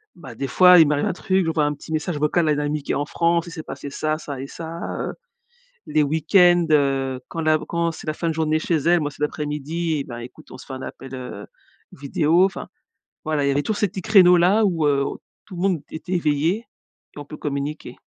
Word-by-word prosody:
bah, 155 -7 -11
des 135 - -3
fois 180 +5 +7
il 160 - +7
m'arrivait 145 -1 +1
un - - -1
truc, 190 0 0
j'envoie 160 -2 +1
un 150 - 0
petit 145 - -12
message 155 0 -2
vocal 155 +2 +1
à - - +4
une 145 - -1
amie 150 0 -2
qui - - -3
est - - 0
en 145 - -1
France, 170 +2 +1
il - - -8
s'est 160 -2 -7
passé 140 - -7
ça, 155 +2 -2
ça 140 -4 -7
et 135 - -6
ça. 165 +2 -8 0.2
Heu, - - -4 0.7
les 155 -1 +2
week-ends, 175 +3 +4
heu, 135 -3 +1
quand 165 - -4
la 155 0 +3
quand 170 0 0
c'est 155 - -11
la 155 - 0
fin 170 - -3
de - - -1
journée 155 0 0
chez 165 - 0
elle, 170 +4 +3
moi, 145 -1 -2
c'est 145 - -16
l'après-midi, 150 +1 -2
ben, 120 -2 -8
écoute 125 +6 -12
on - - -9
se - - -13
fait 135 - -8
un 130 - -6
appel 135 0 -9
heu, 125 -1 -7 0.5
vidéo. 155 +6 +2
Enfin, 195 - -4 0.6
voilà, 155 -3 0
il - - +1
y - - +3
avait 145 +1 0
tous 215 - -1
ces 205 - +1
petits 185 +1 -7
créneaux 185 -4 +6
là, 195 +6 +4
où, 165 -5 0
heu, 140 -1 +2 0.4
tout 190 - -11
le 175 - -5
monde 185 -6 +1
était 175 +4 -6
éveillé 165 +6 0 0.5
et - - -8
on 145 - -8
peut 150 - -10
communiquer. 145 +1 -5
155 Hz, 240 wpm, -22 LUFS, 145-170 Hz, 0.7 s, fois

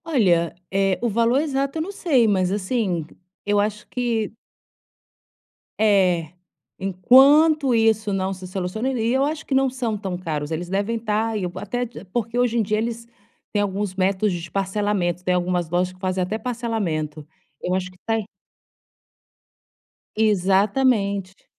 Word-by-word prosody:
Olha, 185 - +2 0.2
eh, 195 -1 +2
o 240 - +1
valor 230 +4 +2
exato 275 -1 -1
eu - - -1
não 360 +5 -4
sei, 285 - +2
mas 185 -3 +2
assim, 195 -4 -1 0.4
eu 205 0 +2
acho 210 +1 -2
que 230 -4 -1 1.5
É. 185 -7 +3 0.5
Enquanto 270 - +5
isso 220 -2 +2
não 190 0 -1
se 185 0 -9
soluciona 190 +6 -3
e 235 -2 0
eu 265 +1 +2
acho 310 +2 -2
que - - -3
não 265 0 +3
são 245 -4 -2
tão 190 -3 -4
caros, 155 -4 -3
eles 165 +2 -3
devem 200 +5 -1
estar, 220 0 -1
eu 180 -3 -3
até, 245 +6 -2 0.3
porque 235 +1 -1
hoje 240 -1 +2
em 225 - +3
dia 215 +1 0
eles 230 +1 -4 0.5
têm 205 - +2
alguns 200 -1 -2
métodos 195 +1 +1
de 175 0 -5
parcelamento, 195 -3 -1
tem 180 0 +1
algumas 175 -2 0
lojas 180 +2 0
que 185 - -20
fazem 185 0 -1
até 210 +5 -2
parcelamento. 200 -11 -3 0.3
Eu 180 - -1
acho 185 -1 -3
que 185 - -21
tá 225 - +1
aí 220 -2 -2 1.9
Exatamente. 200 0 +1
205 Hz, 155 wpm, -23 LUFS, 185-235 Hz, 1.9 s, Enquanto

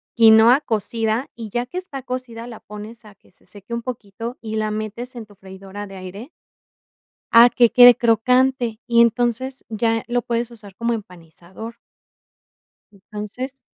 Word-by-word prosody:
quinoa 225 +4 +7
cocida, 225 +1 -1
y 225 -2 -8
ya 240 +2 -1
que 355 - -8
está 365 -7 -6
cocida, 245 -2 -6
la 230 - -10
pones 215 +3 -11
a 210 - -14
que - - -28
se - - -21
seque 200 +4 -11
un 235 - -5
poquito 230 0 -7
y 220 -1 -5
la 215 0 -1
metes 215 +4 -5
en 235 -2 -7
tu 205 - -19
freidora 195 +1 -10
de 195 -1 -11
aire. 195 - -9 1.1
A 235 - +11
que 240 -1 +3
quede 245 -1 +10
crocante. 240 0 +2
Y 235 -1 +4
entonces, 240 +3 +1
ya 225 0 0
lo 245 0 0
puedes 235 +1 -2
usar 210 -5 -14
como 235 0 -1
empanizador. 185 +3 -10 1.2
Entonces, 210 +6 -8
230 Hz, 155 wpm, -21 LUFS, 210-245 Hz, 1.2 s, A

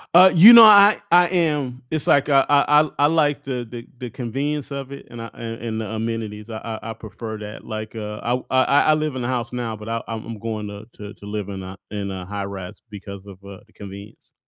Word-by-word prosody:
Uh, 185 +1 +8
you 200 +8 +9
know, 230 -1 +11
I 205 -1 +8
I 175 0 +6
am, 150 -8 -1
it's 155 -2 -2
like, 140 +1 +3
uh, 135 -1 +5
I 145 -1 +5
I 150 0 +4
l 155 -1 -1
I 145 - +3
like 150 -2 +1
the 125 -3 -4
the 120 0 -9
the 125 -2 -6
convenience 140 +5 -4
of 140 -1 -6
it 140 - -10
and 120 -1 -9
I 115 - -6
and 115 -1 -7
and 110 -1 -4
the - - -5
amenities, 110 0 -5
I 110 0 -6
I 115 0 -6
prefer 110 0 -8
that. 105 0 -9
Like, 110 0 -7
uh, 105 -1 -6
I 120 - -3
w 125 +1 -1
I 130 0 +3 0.3
I 155 - +6
live 155 -3 -3
in 125 - -4
a - - -2
house 125 -1 -3
now, 120 -3 -4
but 105 +1 -11
I 115 0 -3
I'm 115 -1 -7
going 110 -1 -5
to 105 +2 -10
to 105 0 -10
to - - -15
live 105 -1 -5
in 95 -1 -6
a 95 +1 -9
in 100 -1 -4
a 95 -1 -7
high-rise 100 -2 -7
because 100 -1 -10
of, 95 -2 -12
uh, 100 -1 -11
the - - -29
convenience. 100 +1 -12
115 Hz, 245 wpm, -21 LUFS, 105-140 Hz, 0.3 s, know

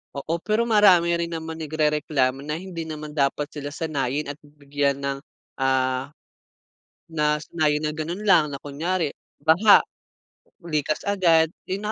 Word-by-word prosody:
Oo, 160 +4 -3
pero 215 +5 0
marami 200 -7 +5
rin 170 0 0
naman 160 -1 -6
nagrereklamo 150 -4 0
na 150 +2 -4
hindi 170 -2 -6
naman 155 -1 -7
dapat 145 0 -1
sila 145 -1 -6
sanayin 145 -2 -2
at 145 - -12
bigyan 145 -1 -2
ng, 140 0 -1 0.4
ah, 130 0 +1 1.0
na 150 -2 0
sanayin 155 -1 0
na 150 - -2
gano'n 170 +7 -5
lang, 160 -6 +5
na 140 - -5
kunyari, 155 +3 -2 0.2
baha, 165 +8 +5 0.8
likas-agad. 165 +1 +1 0.2
'Yun 205 +3 -3
155 Hz, 130 wpm, -24 LUFS, 145-170 Hz, 1.0 s, marami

